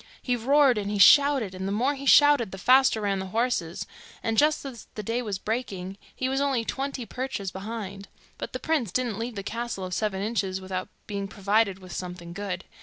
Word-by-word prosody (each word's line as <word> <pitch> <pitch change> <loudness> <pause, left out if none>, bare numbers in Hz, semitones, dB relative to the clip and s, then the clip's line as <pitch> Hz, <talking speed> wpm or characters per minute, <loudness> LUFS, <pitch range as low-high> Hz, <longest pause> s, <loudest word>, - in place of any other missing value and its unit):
He 250 - -1
roared 265 0 +4
and 200 -1 -3
he 205 - -1
shouted, 270 0 +6
and 190 +1 -4
the - - -2
more 245 +8 +1
he 275 0 -7
shouted, 290 -9 +6
the 190 - -7
faster 255 +2 +4
ran 200 -2 0
the 190 - -4
horses, 205 -5 -1 0.4
and 225 - 0
just 300 +4 +3
as 250 -4 -8
the 215 - -5
day 230 +4 -1
was 210 -5 -3
breaking 195 -4 -4 0.2
he 255 - -1
was 270 +1 0
only 270 -5 +1
twenty 270 -1 -3
perches 250 -7 -4
behind. 200 -1 -6 0.3
But - - -5
the - - -3
prince 290 - 0
didn't 240 -3 -1
leave 230 0 -4
the 200 - -5
castle 230 -2 -4
of 180 - -5
Seven 195 -1 -1
Inches 200 -4 -1
without 185 -1 -5 0.2
being 200 -1 -4
provided 200 0 +1
with 185 -2 -12
something 175 -1 -6
good. 190 -1 -4
215 Hz, 205 wpm, -26 LUFS, 190-255 Hz, 0.4 s, shouted